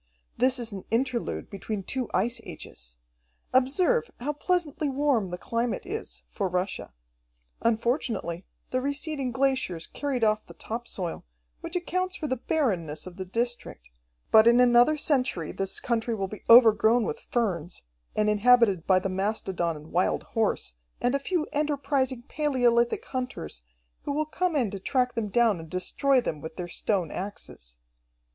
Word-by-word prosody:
"This 255 Hz, +1 st, +2 dB
is 235 Hz, -2 st, -5 dB
an 195 Hz, -2 st, -7 dB
interlude 235 Hz, +1 st, -1 dB
between 200 Hz, 0 st, -4 dB
two 255 Hz, +4 st, -3 dB
ice 230 Hz, +5 st, 0 dB
ages. -, -, -10 dB, 0.6 s
Observe 360 Hz, -, +3 dB
how 285 Hz, +5 st, -2 dB
pleasantly 310 Hz, -2 st, -1 dB
warm 270 Hz, -6 st, +1 dB
the 180 Hz, 0 st, -5 dB
climate 230 Hz, +4 st, -2 dB
is, 430 Hz, +4 st, -6 dB
for 200 Hz, -, -2 dB
Russia. 180 Hz, -, -2 dB, 0.7 s
Unfortunately 230 Hz, -, 0 dB, 0.3 s
the 255 Hz, -, +1 dB
receding 280 Hz, -1 st, -2 dB
glaciers 260 Hz, -10 st, 0 dB
carried 275 Hz, -5 st, -3 dB
off 215 Hz, 0 st, +2 dB
the -, -, -12 dB
top 235 Hz, +2 st, -5 dB
soil, 175 Hz, -4 st, -4 dB, 0.4 s
which 335 Hz, -, -7 dB
accounts 365 Hz, +1 st, -1 dB
for 315 Hz, -, -4 dB
the 260 Hz, -3 st, -1 dB
barrenness 185 Hz, -, -1 dB
of 185 Hz, 0 st, -10 dB
the 190 Hz, -, -4 dB
district, 235 Hz, -, -3 dB, 0.4 s
but 220 Hz, +1 st, +8 dB
in 235 Hz, +1 st, +6 dB
another 245 Hz, +4 st, +5 dB
century 255 Hz, -, 0 dB
this 195 Hz, 0 st, -2 dB
country 230 Hz, -1 st, -1 dB
will 195 Hz, -2 st, -2 dB
be 210 Hz, +1 st, -9 dB
overgrown 230 Hz, 0 st, +7 dB
with 150 Hz, -, -3 dB
ferns, 180 Hz, -8 st, -1 dB, 0.3 s
and 215 Hz, -, +2 dB
inhabited 210 Hz, -4 st, +4 dB
by 185 Hz, -, +5 dB
the 185 Hz, -, 0 dB
mastodon 190 Hz, -3 st, -1 dB
and 150 Hz, +1 st, -12 dB
wild 180 Hz, +2 st, +1 dB
horse, 220 Hz, -, 0 dB, 0.3 s
and 245 Hz, -, +1 dB
a 280 Hz, -, +2 dB
few 325 Hz, +2 st, -1 dB
enterprising 275 Hz, -4 st, 0 dB
palaeolithic 245 Hz, -5 st, +1 dB
hunters, 250 Hz, -, -5 dB, 0.4 s
who -, -, -1 dB
will 305 Hz, +2 st, 0 dB
come 345 Hz, +2 st, -1 dB
in 240 Hz, -8 st, +1 dB
to 200 Hz, -, -5 dB
track 250 Hz, +4 st, +1 dB
them 230 Hz, -3 st, -2 dB
down 225 Hz, -4 st, +3 dB
and 160 Hz, -1 st, -10 dB
destroy 255 Hz, -, +2 dB
them 155 Hz, -11 st, -3 dB
with 160 Hz, 0 st, -7 dB
their 180 Hz, -, -5 dB
stone 175 Hz, -1 st, -1 dB
axes." -, -, -8 dB
235 Hz, 155 wpm, -27 LUFS, 190-270 Hz, 0.7 s, but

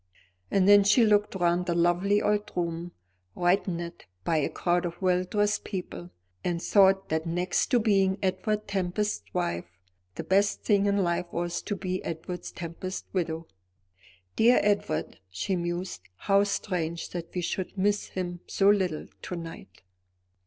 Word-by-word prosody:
And 195 Hz, -1 st, +3 dB
then 205 Hz, 0 st, +8 dB
she 210 Hz, +4 st, +5 dB
looked 210 Hz, -1 st, +2 dB
round 175 Hz, -1 st, +1 dB
the 170 Hz, -, 0 dB
lovely 175 Hz, +4 st, +2 dB
old 210 Hz, 0 st, 0 dB
room, 170 Hz, 0 st, -2 dB, 0.4 s
brightened 175 Hz, -1 st, 0 dB, 0.2 s
by 165 Hz, -, +1 dB
a 150 Hz, -, +1 dB
crowd 175 Hz, 0 st, 0 dB
of 175 Hz, -1 st, -5 dB
well 185 Hz, -1 st, +2 dB
dressed 205 Hz, +2 st, 0 dB
people, 180 Hz, -, -6 dB, 0.3 s
and 175 Hz, -1 st, -1 dB
thought 195 Hz, +1 st, +4 dB
that 160 Hz, +1 st, -1 dB
next 175 Hz, +2 st, 0 dB
to 245 Hz, -, +3 dB
being 195 Hz, -3 st, +2 dB
Edward 210 Hz, +3 st, -1 dB
Tempest's 200 Hz, +1 st, -2 dB
wife, 85 Hz, -, -3 dB, 0.4 s
the -, -, -4 dB
best 200 Hz, +2 st, +2 dB
thing 205 Hz, -2 st, +3 dB
in 200 Hz, -1 st, +2 dB
life 175 Hz, 0 st, 0 dB
was 175 Hz, 0 st, -2 dB
to 205 Hz, -, -3 dB
be 185 Hz, -1 st, -3 dB
Edward 165 Hz, +2 st, -5 dB
Tempest's 175 Hz, +3 st, -7 dB
widow. 165 Hz, -3 st, -2 dB, 0.9 s
"Dear 235 Hz, +3 st, +5 dB
Edward!" 200 Hz, -6 st, 0 dB
she 95 Hz, -, -2 dB
mused, 175 Hz, -, -3 dB
"how 200 Hz, -, +3 dB
strange 170 Hz, -5 st, -2 dB
that 170 Hz, 0 st, -6 dB
we 180 Hz, -, 0 dB
should 185 Hz, +3 st, -3 dB
miss 205 Hz, +2 st, +1 dB
him 175 Hz, -2 st, -4 dB
so 200 Hz, +1 st, +4 dB
little 185 Hz, -6 st, 0 dB, 0.2 s
to 180 Hz, -, -5 dB
night." 165 Hz, -, -9 dB
180 Hz, 150 wpm, -28 LUFS, 170-200 Hz, 0.9 s, then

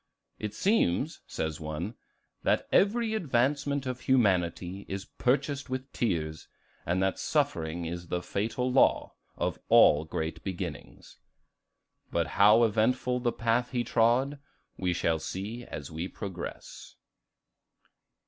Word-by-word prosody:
"It 105 Hz, -1 st, -4 dB
seems," 160 Hz, -, +1 dB
says 80 Hz, -1 st, -3 dB
one, 80 Hz, +6 st, -4 dB, 0.5 s
"that -, -, +1 dB
every 220 Hz, +2 st, +3 dB
advancement 140 Hz, -, 0 dB
of 125 Hz, -1 st, -3 dB
humanity 95 Hz, -6 st, +1 dB
is 95 Hz, 0 st, -5 dB
purchased 140 Hz, +2 st, -1 dB
with 130 Hz, +1 st, -5 dB
tears, 80 Hz, -8 st, -2 dB, 0.4 s
and 90 Hz, +3 st, +1 dB
that 95 Hz, -, 0 dB
suffering 80 Hz, +1 st, 0 dB
is 85 Hz, +1 st, -5 dB
the 90 Hz, 0 st, -2 dB
fatal 115 Hz, +5 st, -1 dB
law 130 Hz, -, +3 dB, 0.2 s
of -, -, -2 dB
all 75 Hz, +2 st, +6 dB
great 80 Hz, +1 st, -4 dB
beginnings." 85 Hz, -10 st, -6 dB, 0.9 s
But 85 Hz, -1 st, 0 dB, 0.2 s
how 105 Hz, +3 st, +7 dB
eventful 125 Hz, +3 st, +2 dB
the 120 Hz, -1 st, +1 dB
path 115 Hz, +2 st, 0 dB
he 120 Hz, -1 st, +1 dB
trod, 125 Hz, +6 st, +2 dB, 0.4 s
we 90 Hz, -1 st, -1 dB
shall 85 Hz, -2 st, +1 dB
see 105 Hz, +9 st, -5 dB
as 75 Hz, 0 st, -7 dB
we 80 Hz, +3 st, -3 dB
progress. 95 Hz, -3 st, -8 dB
105 Hz, 120 wpm, -29 LUFS, 85-125 Hz, 0.9 s, how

